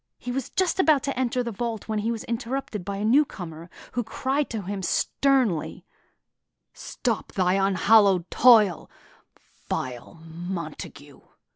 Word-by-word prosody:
He 245 - -6
was 260 0 -3
just 375 0 0
about 310 -7 +4
to 275 - -2
enter 250 -1 0
the 235 - -4
vault 225 0 -4
when 215 -1 -1
he 225 +3 -1
was 225 -2 -4
interrupted 235 -3 -4
by 200 +1 -4
a 205 - -2
newcomer, 180 - 0 0.2
who 245 - -2
cried 270 +5 -2
to 220 -3 -4
him 195 +1 -4
sternly: 250 - 0 0.9
"Stop 235 -4 -4
thy 185 -1 +2
unhallowed 195 -1 +3
toil, 215 -8 +5 0.8
vile 125 +1 -4
Montague!" 165 -4 -7
215 Hz, 135 wpm, -25 LUFS, 180-250 Hz, 0.9 s, toil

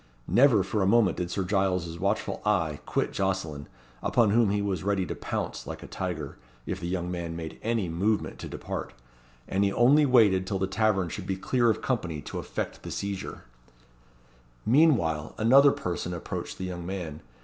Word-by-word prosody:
Never 120 -6 +5
for 100 +3 -1
a 95 - +2
moment 105 -4 +4
did 90 -1 -2
Sir 95 +2 -1
Giles' 90 -3 0
watchful 100 +4 -1
eye 85 -8 +1
quit - - -1
Jocelyn, 90 -7 -2 0.3
upon 115 -4 +3
whom 115 -1 +4
he 100 +1 +1
was 100 -4 -2
ready 100 -2 +1
to - - -4
pounce - - -4
like - - -6
a - - -9
tiger, 80 -7 -5 0.3
if - - -3
the 85 - -4
young 90 -1 -2
man 85 -2 -4
made 80 -1 -7
any 115 -4 0
movement 100 +6 -1
to - - -6
depart; - - -5 0.5
and 100 +1 +1
he 100 - +2
only 140 +7 +5
waited 105 -7 +4
till 100 -1 -1
the 95 - 0
tavern 95 -2 +1
should 95 +2 -6
be 95 -1 -1
clear 120 +4 +2
of 110 - 0
company 90 - -1
to - - -6
effect - - -5
the - - -7
seizure. 100 -1 -4 1.2
Meanwhile 110 - +3
another 135 +6 +6
person 90 -3 -3
approached 85 - -5
the 95 - -4
young 90 -1 -5
man. 85 -4 -5
95 Hz, 180 wpm, -27 LUFS, 85-110 Hz, 1.2 s, another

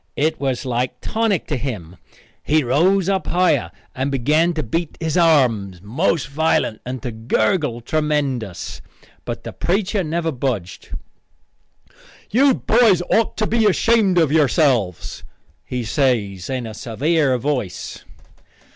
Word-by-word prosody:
It 155 +2 0
was 135 -2 -2
like 125 0 -2
tonic 220 -5 0
to 150 - -2
him. 105 - -5 0.5
He 155 0 +2
rose 175 +9 +2
up 195 -1 0
higher 175 - +2 0.2
and 130 +2 -2
began 150 +6 +2
to 155 - -1
beat 165 +7 -3
his 160 -2 -2
arms 125 - +3
most 155 - 0
violent 150 -6 0
and 125 -2 -5
to 125 - -3
gurgle 115 - 0
tremendous. 140 - -2 0.4
But - - -5
the - - -7
preacher 195 +2 0
never 165 +1 -1
budged. 120 - -4 1.4
"You 265 +4 +4
boys 215 -6 +3
otter 220 -1 +1
be 225 0 +2
ashamed 205 -2 +3
of 160 -4 +3
yourselves," 135 - +1 0.4
he 125 -1 -3
says 105 - 0
in 130 -2 -3
a 110 - -7
severe 135 +5 0
voice. 125 -6 -3
145 Hz, 130 wpm, -20 LUFS, 120-170 Hz, 1.4 s, You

